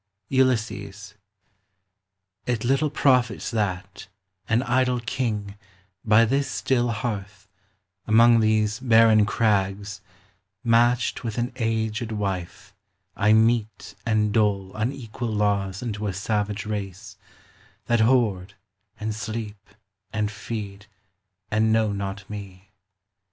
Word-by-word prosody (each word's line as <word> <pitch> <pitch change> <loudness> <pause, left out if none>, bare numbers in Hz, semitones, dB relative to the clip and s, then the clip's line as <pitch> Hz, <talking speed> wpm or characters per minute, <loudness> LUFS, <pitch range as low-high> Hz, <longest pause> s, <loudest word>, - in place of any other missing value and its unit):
ULYSSES. 105 -6 0 1.3
It 120 -3 -1
little 135 +4 +2
profits 125 -6 +2
that, 95 -3 -3 0.4
an 115 +2 +2
idle 125 0 +1
king, 110 -4 -3 0.5
By 110 +1 +5
this 135 +4 0
still 120 -2 0
hearth, 105 -3 -4 0.6
among 115 +2 +6
these 110 0 +1
barren 115 -4 +5
crags, 100 -3 0 0.6
Matched 120 +1 +2
with 115 -2 -4
an 120 +1 -1
aged 110 -1 -1
wife, 95 -5 -4 0.4
I 105 +1 +3
mete 110 0 +1
and 105 -2 +1
dole 100 -3 +1
Unequal 120 0 -4
laws 100 -1 0
unto 105 -3 -3
a 95 - -2
savage 105 +1 -2
race, 100 0 -5 0.7
That 120 -1 +2
hoard, 110 -5 +2 0.4
and 110 0 -2
sleep, 110 -2 -6 0.4
and 105 -1 -1
feed, 105 -1 -7 0.6
and 110 +1 +2
know 110 -2 +2
not 100 0 -5
me. 95 -2 -9
110 Hz, 105 wpm, -24 LUFS, 100-115 Hz, 1.3 s, among